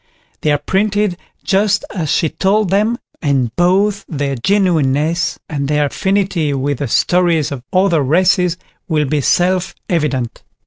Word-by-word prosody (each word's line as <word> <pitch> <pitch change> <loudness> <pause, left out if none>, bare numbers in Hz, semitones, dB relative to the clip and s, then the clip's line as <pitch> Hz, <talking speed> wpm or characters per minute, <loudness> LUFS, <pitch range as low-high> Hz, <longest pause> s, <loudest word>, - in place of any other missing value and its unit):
They 150 - +1
are 145 - +3
printed 200 +4 0 0.3
just 205 +1 +1
as 165 -7 -2
she 160 - +1
told 200 +2 +1
them, 215 +4 +2 0.2
and 135 -6 0
both 195 +4 +2
their 140 -3 -2
genuineness 170 - +1
and 140 -3 -3
their 150 0 +1
affinity 190 -3 0
with 135 0 -2
the 145 - -2
stories 170 +3 +2
of 135 -3 -5
other 185 -4 +2
races 180 +4 +2 0.3
will 155 -2 +1
be 145 +1 0
self 180 +5 +1
evident. 140 -8 -1
170 Hz, 140 wpm, -16 LUFS, 145-190 Hz, 0.3 s, are